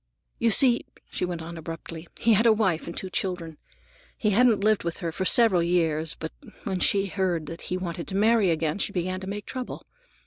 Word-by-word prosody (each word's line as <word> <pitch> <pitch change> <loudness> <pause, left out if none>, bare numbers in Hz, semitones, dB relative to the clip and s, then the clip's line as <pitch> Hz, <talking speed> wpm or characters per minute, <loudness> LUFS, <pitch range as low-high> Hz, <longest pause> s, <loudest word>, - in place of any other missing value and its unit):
"You 235 - +3
see," 240 +2 +5 0.2
she - - -1
went 175 -2 -5
on 170 0 -8
abruptly, 165 +1 -8
"he 230 -1 +4
had 220 +3 +4
a - - +7
wife 190 -7 0
and 170 - -7
two 190 - -5
children. 180 -7 -3 0.6
He 215 - +1
hadn't 225 -1 +3
lived 215 -1 +3
with 170 -1 -3
her 170 -3 -3
for 190 +4 -3
several 200 -2 +5
years, 165 -2 0
but 160 - -6 0.3
when 190 -2 -2
she 195 +2 +2
heard 185 -4 -1
that 165 +2 -8
he 185 - -1
wanted 170 -2 -5
to 190 - -4
marry 215 -1 +3
again, 160 +1 -1
she 200 - -2
began 185 +1 -2
to 190 - -8
make 205 +1 -5
trouble. 255 -1 -6
185 Hz, 210 wpm, -26 LUFS, 170-210 Hz, 0.6 s, a